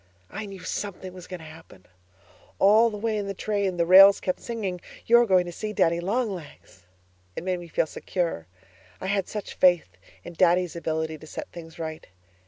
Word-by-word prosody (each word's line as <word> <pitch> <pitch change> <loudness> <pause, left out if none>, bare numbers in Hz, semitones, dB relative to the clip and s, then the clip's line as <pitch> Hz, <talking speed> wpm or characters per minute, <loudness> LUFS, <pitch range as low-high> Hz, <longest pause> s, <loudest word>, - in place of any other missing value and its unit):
I 210 +1 -6
knew 195 -2 -10
something 185 0 -5
was 180 -1 -11
going 180 -2 -8
to - - -11
happen. 155 - -14 0.7
All 215 +4 +5
the 210 - -6
way 220 +1 -1
in 200 - -4
the 195 - -4
train 200 -3 -1
the 170 - +2
rails 195 +3 +8
kept 185 - -2
singing, 200 -7 -4 0.2
'You're 235 +1 +5
going 185 -2 +4
to 175 - -6
see 215 +4 -5
Daddy 170 -4 +2
Long 215 +6 -1
Legs.' 140 - -12 0.5
It - - -5
made 185 -1 -1
me 175 - -10
feel 160 - 0
secure. 165 - -3 0.5
I - - -7
had 195 -1 0
such 210 -2 -6
faith 175 - +3 0.3
in - - -9
Daddy's 175 -1 +2
ability 160 -1 -3
to 155 - -13
set - - -7
things 165 -1 -11
right. 160 -1 -6
180 Hz, 190 wpm, -25 LUFS, 165-200 Hz, 0.7 s, rails